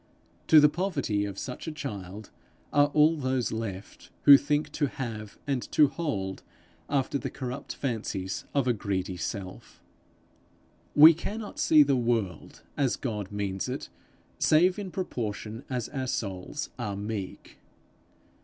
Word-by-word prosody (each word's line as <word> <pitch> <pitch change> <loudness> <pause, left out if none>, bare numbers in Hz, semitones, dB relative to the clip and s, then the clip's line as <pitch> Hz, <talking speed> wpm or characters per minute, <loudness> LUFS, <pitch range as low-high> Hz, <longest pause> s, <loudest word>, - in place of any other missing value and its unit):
To 155 - +8
the 150 - +7
poverty 145 - -1
of 100 -1 -6
such 125 +8 -6
a - - -2
child 105 - -7 0.4
are 145 0 +5
all 150 +2 +4
those 130 -3 -1
left, 105 -4 -6
who 140 - +11
think 145 +2 +1
to 145 - 0
have 110 -6 -6
and 135 -3 -1
to 150 -2 +6
hold 100 - -3 0.5
after 140 0 0
the - - -4
corrupt 125 +2 -6
fancies 105 -7 -3
of 140 -3 +1
a 125 - +4
greedy 95 -3 -3
self. 90 +2 -6 1.2
We 155 +3 +10
cannot 205 +6 -6
see 155 -2 +6
the 140 -1 +2
world 115 -9 -2
as 135 -4 +1
God 105 -6 -4
means 100 -2 -3
it, - - -5 0.5
save 180 +5 +4
in 200 -2 -5
proportion 115 - -4
as 125 -3 -2
our 130 -3 -3
souls 100 +5 -4
are 105 -4 -3
meek. 100 -1 -6
125 Hz, 140 wpm, -28 LUFS, 100-145 Hz, 1.2 s, who